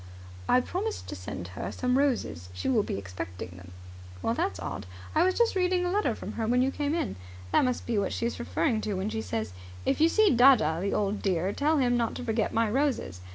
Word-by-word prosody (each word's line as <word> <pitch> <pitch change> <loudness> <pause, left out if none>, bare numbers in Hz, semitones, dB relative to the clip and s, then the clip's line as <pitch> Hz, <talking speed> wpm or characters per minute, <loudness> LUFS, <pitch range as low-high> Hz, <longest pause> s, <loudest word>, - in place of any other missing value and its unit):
"I 255 - +5
promised 410 - -3
to - - -4
send 90 -1 -6
her 90 - -5
some 250 0 0
roses. 230 - 0
She 90 - -4
will 250 -5 +4
be 150 - -3
expecting 90 -2 -6
them." 90 0 -12 0.5
"That's 100 -4 0
odd. 90 +1 -5 0.3
I - - +3
was 370 +1 +2
just 470 -3 +3
reading 360 -1 +2
a 355 - 0
letter 415 +2 +1
from - - -6
her 225 -1 -2
when 250 +2 +3
you 265 - +1
came 295 +2 -1
in. 315 - -2 0.3
That - - +4
must 250 -1 -1
be 230 -3 0
what 200 - -1
she's 235 +1 -2
referring 240 -1 0
to 210 -2 -2
when 190 +3 -2
she 220 0 -2
says, 110 - -3 0.3
'If - - +1
you 325 - +6
see 435 +3 +4
dadda, 230 - +6
the 200 - -1
old 205 0 0
dear, 185 0 0
tell 305 +2 +2
him 245 -3 +3
not 235 -1 0
to - - -5
forget 225 -2 0
my 230 0 +2
roses.' 230 - -1
230 Hz, 225 wpm, -28 LUFS, -, 0.5 s, you